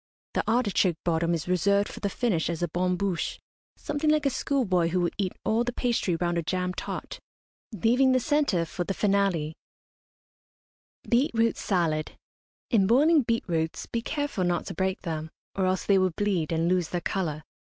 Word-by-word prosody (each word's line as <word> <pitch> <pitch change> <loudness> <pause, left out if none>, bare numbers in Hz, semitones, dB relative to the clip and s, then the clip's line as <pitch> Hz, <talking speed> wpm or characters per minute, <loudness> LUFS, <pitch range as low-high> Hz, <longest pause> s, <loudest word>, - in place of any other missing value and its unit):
The - - +1
artichoke 205 -7 +2
bottom 170 0 +1
is 165 - -5
reserved 200 +3 +2
for - - -9
the 200 - -1
finish 195 -7 0
as 170 0 -2
a - - +2
bon 180 +1 0
bouche, 190 -2 -2 0.4
something 295 0 -1
like 305 -1 +3
a 275 - +3
schoolboy 210 -11 +1
who 180 +2 0
will 175 -1 +1
eat 190 -3 0
all 225 +2 +2
the 245 - -2
pastry 235 -9 0
round 175 0 0
a - - 0
jam 180 +2 -2
tart, - - -6 0.5
leaving 240 +6 +3
the 255 - +4
centre 280 - +1
for 175 +2 -4
the 195 +2 -3
finale. 195 -7 +1 1.5
BEET 250 +4 +3
ROOT 230 0 +2
SALAD. 165 -5 -1 0.6
In 200 -6 +4
boiling 295 +7 +5
beet 230 -2 0
roots 160 -2 -1
be 230 - -3
careful 290 -7 -2
not 175 -1 0
to - - -5
break 190 +2 -1
them, 160 -3 -4 0.2
or 190 -1 0
else 185 0 0
they 195 -1 +4
will 185 0 +3
bleed 190 -7 0
and 165 0 +1
lose 180 -2 +1
their 175 - -1
colour. 160 -5 -2
190 Hz, 180 wpm, -27 LUFS, 170-230 Hz, 1.5 s, boiling